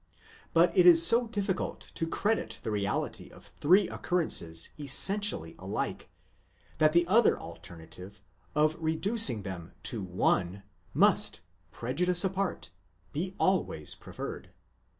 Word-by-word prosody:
But 170 +1 +3
it 180 -1 +5
is 165 -1 +8
so 235 +6 +4
difficult 200 -4 -4
to 165 - -3
credit 185 - -2
the 110 - -3
reality 100 -1 -3
of - - -16
three 185 +5 +2
occurrences 85 - -2
essentially 150 - +2
alike, - - -4 0.7
that 155 0 +4
the 170 +2 +3
other 215 +6 +3
alternative, 85 +5 -11 0.4
of 155 +1 +2
reducing 160 - +2
them 95 -2 -8
to 115 - -2
one, 90 +1 -1 0.3
must, - - +2 0.3
prejudice 175 +9 -1
apart, 190 - -3 0.4
be 185 +5 -4
always 185 - 0
pre - - -14
ferred. - - -6
160 Hz, 120 wpm, -29 LUFS, -, 0.7 s, is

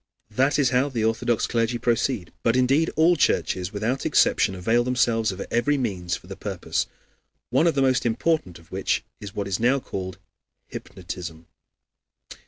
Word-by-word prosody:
That 135 +6 +2
is 140 -4 +3
how 130 +3 +2
the 120 -5 -2
Orthodox 115 +1 +1
clergy 115 0 0
proceed; 120 -3 0
but 115 0 +2
indeed 135 +6 +3
all 165 +3 +5
churches 95 - +1
without 110 +6 -2
exception 95 - +3
avail 115 +7 +2
themselves 120 -3 +1
of 95 +1 -6
every 140 +5 +2
means 90 -9 -2
for - - -11
the - - -8
purpose - - -3 0.6
one 165 - +4
of 165 - +2
the 135 - +3
most 130 -1 +2
important 120 - 0
of 85 - -20
which - - 0 0.2
is 100 -1 -9
what 100 -1 -2
is 95 - -1
now 125 +4 +3
called 95 -6 -6 0.5
hypnotism. 85 -3 -8
120 Hz, 165 wpm, -24 LUFS, 100-130 Hz, 0.6 s, all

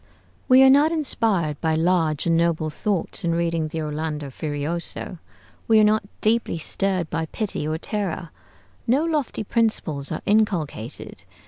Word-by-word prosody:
We 260 +1 +8
are 265 - +8
not 290 +4 +5
inspired 215 - 0
by 160 -1 +1
large 160 -2 +1
and 165 -1 +3
noble 165 -2 +1
thoughts 195 +2 -2
in 170 -1 +1
reading 165 -2 0
the 160 +1 -4
'Orlando 150 -1 -4
Furioso.' 155 +5 -3 0.5
We 220 -1 +5
are - - +6
not 215 +1 +3 0.2
deeply 225 -4 +1
stirred 185 +1 -1
by 165 0 -2
pity 195 -6 -3
or 155 +1 -1
terror. 180 -4 -4 0.6
No 270 +7 +3
lofty 300 -9 -1
principles 195 - 0
are - - -4
inculcated. 180 - -1
170 Hz, 145 wpm, -23 LUFS, 155-215 Hz, 0.6 s, We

